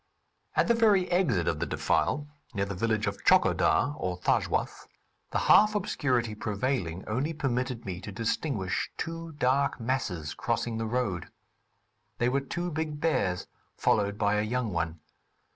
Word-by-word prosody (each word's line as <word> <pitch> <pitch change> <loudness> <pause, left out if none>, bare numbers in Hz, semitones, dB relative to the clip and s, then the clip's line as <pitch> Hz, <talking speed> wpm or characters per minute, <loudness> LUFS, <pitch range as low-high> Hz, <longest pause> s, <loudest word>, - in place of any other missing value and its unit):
At - - +3
the 235 - +5
very 210 -5 +4
exit 140 - +2
of - - 0
the - - -1
defile, 145 +2 0 0.3
near 100 -1 +1
the 100 - -4
village 110 +2 0
of 100 -1 -4
Tchokodar, 135 - +4
or 90 -1 -2
Thajwas, - - 0 0.4
the - - -1
half 210 +1 +5
obscurity 125 - 0
prevailing 105 -4 -2
only 130 +9 -1
permitted 125 -4 -2
me 95 -2 -5
to 100 - -7
distinguish 110 -1 -1
two 165 0 -5
dark 140 0 +1
masses 105 - -2
crossing 115 - -2
the 115 - -2
road. 110 -8 -1 0.9
They 120 - +2
were 140 +2 +1
two 175 +5 -3
big 155 -1 -3
bears 95 - 0 0.3
followed 100 -1 +2
by 105 0 +2
a - - +2
young 115 -1 -1
one. 85 -1 -2
120 Hz, 150 wpm, -29 LUFS, 100-145 Hz, 0.9 s, the